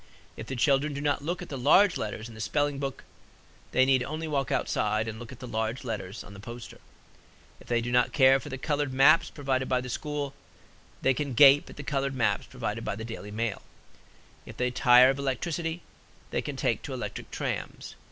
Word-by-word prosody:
If - - -8
the 135 - -4
children 140 +2 +2
do - - -3
not 145 -1 0
look 175 +3 -3
at - - -11
the 135 - -5
large 180 +9 +5
letters 110 +1 -4
in 115 - -12
the 110 - -8
spelling 145 +3 0
book, 135 -1 -4 0.7
they 130 - +4
need 130 -1 +3
only 155 +5 -4
walk 140 -3 -1
outside 110 +1 0
and 110 0 -5
look 120 0 -9
at 130 - -10
the 125 - -9
large 110 +2 -2
letters 105 -3 -5
on 100 - -13
the 100 - -11
poster. 115 +3 -9 0.8
If - - -17
they 120 -1 +1
do 120 +1 -3
not 125 0 +3
care 135 +1 +5
for - - -9
the 130 - -5
colored 145 0 -1
maps 150 +5 +5
provided 135 -3 -2
by 125 - +2
the 125 0 -6
school, 145 +1 -3 0.7
they 135 - +4
can 140 -1 -3
gape 140 +2 +7
at - - -11
the 145 - -6
colored 140 -1 -1
maps 120 -3 0
provided - - -4
by - - -3
the 110 +1 -6
Daily 115 -3 -7
Mail. 110 +1 -3 0.8
If - - -12
they 125 0 0
tire 125 +1 +6
of 135 - -5
electricity, 165 +5 -2 0.5
they - - 0
can - - -5
take - - 0
to - - -6
electric - - -6
trams. - - -5
130 Hz, 210 wpm, -28 LUFS, 120-145 Hz, 0.8 s, gape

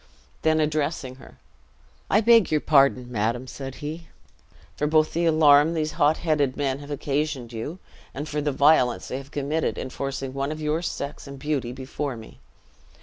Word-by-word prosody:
Then 160 0 +2
addressing 150 -4 -1
her, - - -15 0.7
"I 210 - +4
beg 230 -2 +5
your 155 - +2
pardon, 135 -4 +3
madam," 115 +3 -1
said 135 0 -7
he, 160 +2 -6 0.7
"both 155 +1 +3
for - - -17
the 170 +1 +1
alarm 155 0 +5
these 155 -1 -1
hot 150 +1 +2
headed 150 -5 0
men 135 -1 -1
have 145 0 -11
occasioned 145 -3 -2
you, 115 +10 -5 0.3
and 145 +3 -6
for 150 0 -2
the 145 0 0
violence 140 -3 +3
they 130 - -3
have 135 0 -12
committed 145 +3 -2
in 130 - -5
forcing 135 -1 -4
one 140 +2 -2
of 155 - -5
your 155 +2 -1
sex 140 -4 -5
and 140 0 -8
beauty 135 -3 -2
before 130 +1 -5
me. 110 - -13
145 Hz, 175 wpm, -25 LUFS, 135-155 Hz, 0.7 s, beg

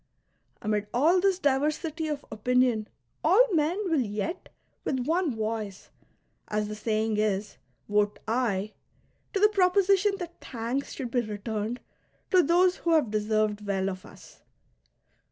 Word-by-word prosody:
Amid 210 -1 0
all 325 +9 +4
this 385 -1 +3
diversity 305 +2 0
of 295 -2 -4
opinion 240 0 +1 0.4
all 465 +2 +5
men 325 +4 +1
will 325 -4 +2
yet 210 - -4 0.3
with 260 -2 -1
one 325 -3 +1
voice, 215 -3 -4 0.6
as 210 0 -1
the 210 - -5
saying 215 0 -1
is, 210 -1 -1 0.3
vote 205 0 +1
"aye" 215 -3 0 0.6
to 400 - -1
the 420 +1 +6
proposition 395 0 +3
that 345 -2 -8
thanks 245 +3 -3
should 250 -3 -5
be 245 - +2
returned 215 +2 -4 0.5
to 370 -2 +6
those 355 +3 +3
who 335 - 0
have 295 -9 +3
deserved 215 0 0
well 195 -1 0
of 185 0 -8
us. - - -15
245 Hz, 135 wpm, -27 LUFS, 215-335 Hz, 0.6 s, the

